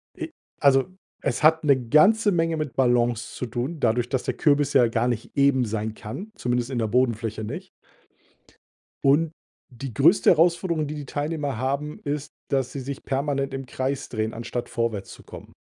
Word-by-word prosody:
Ja, 330 - -5 0.3
also, 135 -2 +5 0.4
es - - -1
hat 160 +1 +5
'ne 135 -5 +2
ganze 210 +8 +5
Menge 165 -2 +1
mit 150 -4 -4
Ballons 120 -2 +1
zu - - -3
tun, 125 +7 -4
dadurch, 120 -1 +1
dass 130 -2 -1
der - - -1
Kürbis 145 -1 +2
ja 125 -4 +6
gar 115 +1 0
nicht 120 -2 -3
eben 140 -3 +3
sein 110 0 -3
kann, 115 - -8
zumindest 125 0 -1
in 130 -3 -2
der 110 - 0
Bodenfläche 115 -2 0
nicht. 105 - -6 1.3
Und 150 +4 +3 0.4
die 125 -1 -7
größte 160 - +5
Herausforderung, 170 -1 +3
die 150 - -5
die 145 -1 -6
Teilnehmer 145 -2 -3
haben, 140 +4 -2
ist, 145 0 -4 0.2
dass 135 -2 0
sie 140 - -5
sich 135 +1 -6
permanent 140 0 -1
im 135 0 -4
Kreis 130 +2 -3
drehen, 110 -1 -2
anstatt 120 +1 -5
vorwärts 115 -5 -2
zu - - -13
kommen. - - -12
135 Hz, 175 wpm, -24 LUFS, 120-150 Hz, 1.3 s, ja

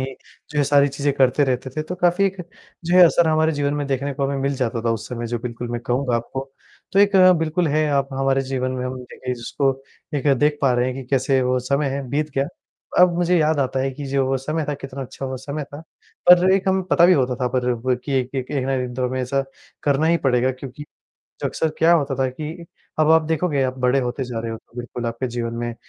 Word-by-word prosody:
ही 135 +1 -3 0.4
जो 150 - -3
ये 145 - +3
सारी 140 0 +4
चीज़ें 140 +1 -1
करते 130 +2 +4
रहते 130 0 -2
थे, 155 - 0
तो 165 +4 -5
काफ़ी 175 +1 +2
एक 190 0 -3 0.5
जो 175 +2 +2
ये 185 - +9
असर 170 0 +4
हमारे 160 0 +2
जीवन 145 -1 -1
में 145 -1 -2
देखने 140 +1 -2
को 140 - -1
हमें 140 0 -2
मिल 140 +1 0
जाता 115 -3 -2
था 115 - +1
उस 110 -1 -5
समय। 120 -1 -4
जो 120 0 -2
बिल्कुल 120 0 -6
मैं 120 0 -3
कहूँगा 125 0 +1
आपको। 135 +3 -5 0.4
तो 195 - +2
एक 200 0 +5 0.2
बिल्कुल 165 +2 0
है 155 +1 +2
आप 140 -1 +1
हमारे 135 0 +1
जीवन 130 -1 -2
में 125 0 -3
हम 130 0 -5
देखिए 125 0 -6
जिसको 135 +3 -1 0.4
एक 145 0 -2
देख 150 +2 +2
पा 135 -2 +4
रहे 125 0 +1
हैं 130 - -2
कि 135 - -6
कैसे 135 0 +2
वो 125 0 +1
समय 140 +1 -1
बीत 150 +2 -1
गया। 135 +1 +1 0.5
अब 180 0 +6
मुझे 175 0 +2
याद 155 -1 +2
आता 130 0 0
है 135 +1 0
कि 145 +2 -7
जो 135 0 +1
वो 135 0 +1
समय 155 +4 -2
था 145 - 0
कितना 135 -1 -7
अच्छा 135 +1 -7
वो 130 0 -4
समय 140 +3 -5
था। 145 +1 -10 0.5
पर 180 +1 +7
एक 195 0 +1
हम 190 0 +2
पता 170 - +5
भी 185 - +6
होता 130 -4 +1
था 125 - +1
पर 125 0 0
कि 140 - -3
एक-एक 130 0 -4
एक 140 -3 -1
ना 135 - 0
एक 130 - 0
दिन 125 - -8
तो 125 0 -1
हमेशा 130 +2 -1 0.4
करना 145 +2 +2
ही 170 - +4
पड़ेगा 130 -1 +3
क्योंकि 130 +2 -9 0.6
अक्सर 160 - 0
क्या 165 +1 +5
होता 145 -5 +2
था 130 0 0
कि 155 +6 -7 0.4
अब 155 0 +4
आप 160 0 +6
देखोगे 160 -3 0
आप 130 0 -2
बड़े 125 +2 +2
होते 125 +1 -3
जा 120 -2 -5
रहे 115 0 -4
हो, - - -5
तो 115 - -26
बिल्कुल 120 0 -5
आपके 115 +3 -3
जीवन 115 -1 -3
में 120 0 -3
135 Hz, 245 wpm, -22 LUFS, 125-150 Hz, 0.6 s, ये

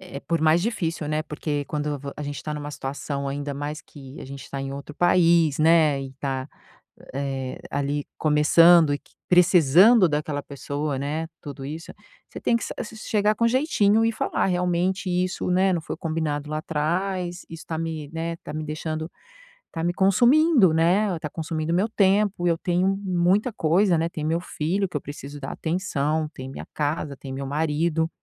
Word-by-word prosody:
Eh 180 -7 -10
eh, - - -5
por 165 +3 -1
mais 160 +2 +4
difícil, 170 -8 -2
né, 155 0 0
porque 150 -1 -3
quando 150 -1 -2
vo 140 +1 -6
a 150 - -5
gente 145 0 -5
tá 150 -1 -4
numa 145 0 -5
situação, 140 0 -4
ainda 145 +1 -4
mais 145 +2 -5
que 135 -1 -12
a - - -7
gente 135 0 -9
tá 140 - -4
em 135 0 -4
outro 140 +2 -8
país, 170 -3 +3
né, 155 -3 +4
e 135 0 -9
tá, 135 0 -3 0.7
eh, 135 -2 -3
ali 145 +1 -1
começando 160 +1 +5
e 145 - -1
que - - -27 0.2
precisando 180 - +6
daquela 150 -1 -2
pessoa, 140 0 -4
né, 150 +4 -2
tudo 140 -2 -8
isso, 155 +4 -7 0.4
você - - -9
tem - - +1
que - - -3
sa - - -5
s 220 - -6
chegar 210 0 +1
com 230 +2 +2
jeitinho 225 -5 +3
e 230 - +2
falar: - - -1
"Realmente 180 +1 0
isso, 180 +1 -1
né, 185 +1 +3
não 170 - 0
foi - - -6
combinado 155 -3 -3
lá 155 - -1
atrás. 175 +4 -2
Isso 165 -1 -9
tá 160 -1 -3
me, 160 -3 -4
né, 165 +1 -3
tá - - -6
me 155 0 -4
deixando 155 +1 -4 0.6
tá 165 -1 -4
me 175 +1 0
consumindo, 240 - +4
né, 180 +5 +3
e - - -6
tá 150 - -5
consumindo 160 +1 -3
o - - +2
meu 200 +5 +1
tempo, 200 -3 +2
e - - +4
eu 165 - +1
tenho 180 +2 +1 0.2
muita 185 +5 +2
coisa, 175 +1 +3
né, 165 - +1
tem 155 -3 -6
meu 165 +2 +1
filho 180 +3 -2
que - - -12
eu - - -6
preciso 145 0 -8
dar - - -5
atenção, 160 -3 -1
tem 130 0 -8
minha - - -8
casa, 150 -1 -2
tem 135 -1 -8
meu 135 +1 -4
marido. 160 +3 0
160 Hz, 195 wpm, -24 LUFS, 145-180 Hz, 0.7 s, precisando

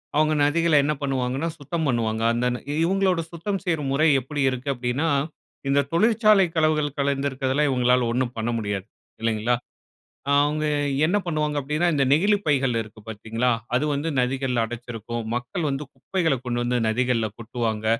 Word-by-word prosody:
அவுங்க 155 +1 +3
நதிகள 165 +2 +2
என்ன 150 +2 +1
பண்ணுவாங்கன்னா, 135 +2 -1
சுத்தம் 160 +3 -3
பண்ணுவாங்க. 115 -3 0
அந்த 120 +1 0 0.4
இவுங்களோட 185 0 +2
சுத்தம் 190 +4 -3
செய்ற 165 -4 0
முறை 145 +4 +3
எப்பிடி 140 +3 -4
இருக்குது 130 +2 -2
அப்டின்னா, 125 +5 -1 0.6
இந்த 140 +1 +3
தொழிற்சாலை 215 +1 +4
களவுகள் 155 -2 +1
கலந்துக்கிறதெல்லாம் 140 0 0
இவுங்களால 125 -1 +3
ஒன்னும் 125 0 -1
பண்ண 110 +1 -1
முடியாது 100 -3 -3 0.4
இல்லேங்களா! 115 +1 +1 0.8
அவுங்க 145 +2 +2 0.4
என்ன 180 +5 +1
பண்ணுவாங்க 150 -3 -1
அப்டின்னா, 150 +5 0
இந்த 140 -2 +2
நெகிழிப் 200 +7 +3
பைகள் 135 -5 +2
இருக்கு 110 0 -14
பார்த்தீங்களா? 115 +3 -1 0.3
அது 135 - +1
வந்து 145 +3 -2
நதிகள்ல 125 -2 0
அடச்சிருக்கும். 120 -1 -6
மக்கள் 130 +6 -2
வந்து 135 +2 -3
குப்பைகள 165 -7 0
கொண்டு 120 -1 -1
வந்து 125 0 +1
நதிகள்ல 115 -1 +1
கொட்டுவாங்க. 110 -2 -3
135 Hz, 145 wpm, -24 LUFS, 120-155 Hz, 0.8 s, தொழிற்சாலை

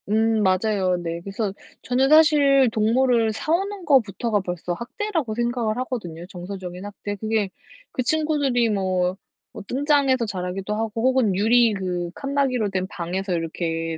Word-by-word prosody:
음 220 +1 +2
맞아요. 190 -1 +1
네. 170 -1 -4
그래서 195 +2 -3 0.3
저는 260 +2 +2
사실 290 -4 +6
동물을 225 +1 +2
사 305 - -3
오는 390 +1 -2
것부터가 230 -5 +2
벌써 175 -1 -4
학대라고 280 - -3
생각을 235 -2 -1
하거든요 195 -10 -5
정서적인 180 0 -7
학대. 205 0 -6
그게 215 -1 -1 0.4
그 - - -2
친구들이 285 -5 +1
뭐 185 -2 0 0.4
뭐 - - -8
뜬장에서 275 -2 +2
자라기도 190 0 -4
하고 225 +1 -2
혹은 255 -6 +3
유리 225 +3 +4
그 180 -3 -3
칸막이로 275 -6 0
된 185 -1 -2
방에서 185 +1 -3
이렇게 165 -1 -2
220 Hz, 325 characters per minute, -23 LUFS, 185-255 Hz, 0.4 s, 사실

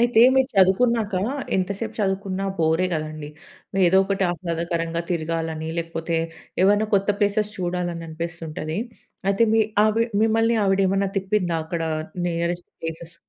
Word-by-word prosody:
అయితే, 240 -1 +4
మీరు 265 -1 +3
చదువుకున్నాక, 210 +3 +3 0.4
ఎంత 185 0 0
సేపు 220 0 -4
చదువుకున్నా 195 -1 -1
బోరే 160 +2 +2
కదండీ. 155 -2 -4 0.6
ఏదో 180 +2 +4
ఒకటి 195 0 -1
ఆహ్లాదకరంగా 170 -1 -2
తిరగాలని 160 -1 -2
లేకపోతే, 165 0 -2 0.5
ఏవైనా 205 +2 +4
కొత్త 200 +1 +2
ప్లేసెస్ 205 +1 +1
చూడలని 175 -2 -2
అనిపిస్తుంటది. 160 0 -5 0.5
అయితే, 200 +3 +2
మీ 225 - +5 0.2
ఆవి 220 +2 +3 0.2
మిమ్మల్ని 225 +1 +3
ఆవిడ 195 0 +2
ఏమన్నా 195 +1 +1
తిప్పిందా, 190 -3 0
అక్కడ 165 0 -3 0.5
నియరెస్ట్ 170 +1 -2
ప్లేసెస్? 165 +1 -6
180 Hz, 125 wpm, -23 LUFS, 165-200 Hz, 0.6 s, మీ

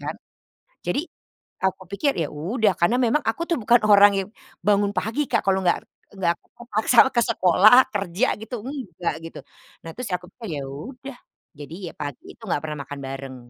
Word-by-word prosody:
kan. - - -5 0.7
Jadi, 310 +5 -1 0.5
aku 190 0 -1
pikir, 275 +8 0
ya 155 - -2
udah, 195 +7 0
karena 175 +9 +2
memang 245 +6 +2
aku 225 +8 -1
tuh 335 - +1
bukan 235 0 +4
orang 205 0 +8
yang 195 +1 -2 0.4
bangun 205 -1 +3
pagi, 230 +8 -1
Kak, - - +2
kalau 190 0 +2
nggak 175 - +2 0.4
nggak 170 -2 +1
ke - - -34
kepaksa 235 0 -1 0.2
ke 235 - +3
sekolah, 220 +4 +6
kerja, 200 +4 0
gitu, 220 +1 -6
enggak, 220 - -4
gitu. 165 - -9 0.5
Nah, 165 - -6
terus 250 -5 -5
aku 180 0 -3
pikir, 210 -11 -6
ya - - -5
udah. 245 - -9 0.4
Jadi, 150 +2 -9
ya, - - -13
pagi 145 -3 -6
itu - - -48
nggak 145 - 0
pernah 155 -1 -4
makan 145 - -8
bareng. 135 0 -6
200 Hz, 180 wpm, -23 LUFS, 170-240 Hz, 0.7 s, orang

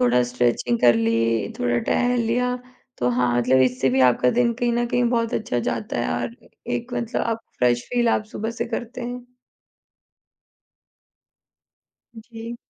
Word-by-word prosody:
थोड़ा 125 0 +4
स्ट्रेचिंग 120 -1 +1
कर 120 -1 +6
ली, 115 0 +1
थोड़ा 120 -1 +1
टहल 245 - +1
लिया, 250 +2 +1 0.4
तो 125 - +1
हाँ, 125 0 +1
मतलब 130 +2 +3
इससे 130 +1 +1
भी 130 +1 +2
आपका 125 +1 +2
दिन 240 -1 +2
कहीं 240 0 0
न 240 0 +1
कहीं 245 0 +1
बहुत 230 -2 0
अच्छा 165 - -1
जाता 210 - -3
है - - -1
और 235 - -5 0.4
एक 245 0 -3
मतलब 235 +1 -2
आप 230 -1 -1 0.2
फ्रेश 120 -1 +2
फील 240 -1 +2
आप 215 - +1
सुबह 220 +2 -3
से - - +2
करते 235 +2 -5
हैं। 245 0 -5 2.9
जी। 230 +1 -8
220 Hz, 155 wpm, -23 LUFS, -, 2.9 s, कर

